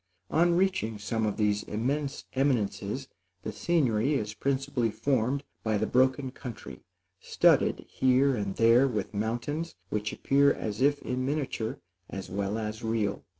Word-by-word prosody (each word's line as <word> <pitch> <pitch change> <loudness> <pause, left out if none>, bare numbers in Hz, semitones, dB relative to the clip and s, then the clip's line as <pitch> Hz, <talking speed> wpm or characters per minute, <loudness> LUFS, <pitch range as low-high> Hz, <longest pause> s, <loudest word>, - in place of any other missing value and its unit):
On 170 +1 +3
reaching 185 - +1
some 110 +1 -1
of 105 - -2
these 105 -1 +2
immense 135 +6 -2
eminences, 130 -2 0 0.4
the - - -3
scenery 135 - +1
is 105 -5 -2
principally 135 -1 0
formed 135 +3 0 0.2
by 110 -1 +1
the 110 - 0
broken 130 +2 +2
country, 115 - -9 0.4
studded - - +3
here 130 +1 +3
and 100 -3 -3
there 115 +4 +5
with 110 -4 -3
mountains, 120 +10 -2
which 105 +1 -2
appear 140 +1 +3
as 105 +2 -4
if 145 +1 +3
in 125 0 -2
miniature, 135 -5 -2 0.3
as 95 -2 -7
well 100 +2 -1
as 110 0 -4
real. 110 -3 -1
120 Hz, 145 wpm, -28 LUFS, 105-140 Hz, 0.4 s, there